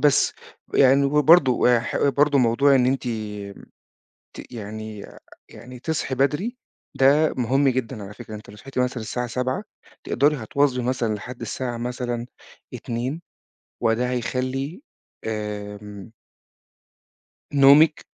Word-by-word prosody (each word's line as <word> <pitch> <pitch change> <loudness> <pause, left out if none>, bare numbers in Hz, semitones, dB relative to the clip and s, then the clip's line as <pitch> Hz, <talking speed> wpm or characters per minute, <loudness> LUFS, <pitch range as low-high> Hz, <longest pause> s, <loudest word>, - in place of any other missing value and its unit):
بس، 145 -2 +3 0.4
يعني 140 +1 +5
ب - - -6 0.2
برضو 160 -7 +6
ويح 120 -1 +2
برضو 145 +1 +3
موضوع 130 +3 +4
إن 125 -1 +4
أنتِ 135 0 0 1.3
ت - - -11
يعني 110 -1 -7 0.4
يعني 125 0 -11
تصحي 145 -3 -2
بدري، 150 - 0 0.4
ده 145 +4 +4
مُهم 135 +3 +2
جدًا 125 -4 -3
على 100 - -9
فكرة، 110 -1 -9
أنتِ 105 - -11
لو 105 - -12
صحيتِ 135 +4 -6
مثلًا 125 -2 -1
الساعة 125 +2 -3
07:00 125 - -2 0.4
تقدري 145 +2 +2
هتواظبي 125 +2 0
مثلًا 120 -3 -1
لحد 120 +4 -9
الساعة 120 +1 -4
مثلًا 120 0 -3 0.5
02:00، 125 +7 -4 0.6
وده 115 +2 +1
هيخلّي 130 - -3 0.4
آمم 105 -1 -6 1.4
نومِك، 145 +3 +6
125 Hz, 120 wpm, -23 LUFS, 115-140 Hz, 1.4 s, برضو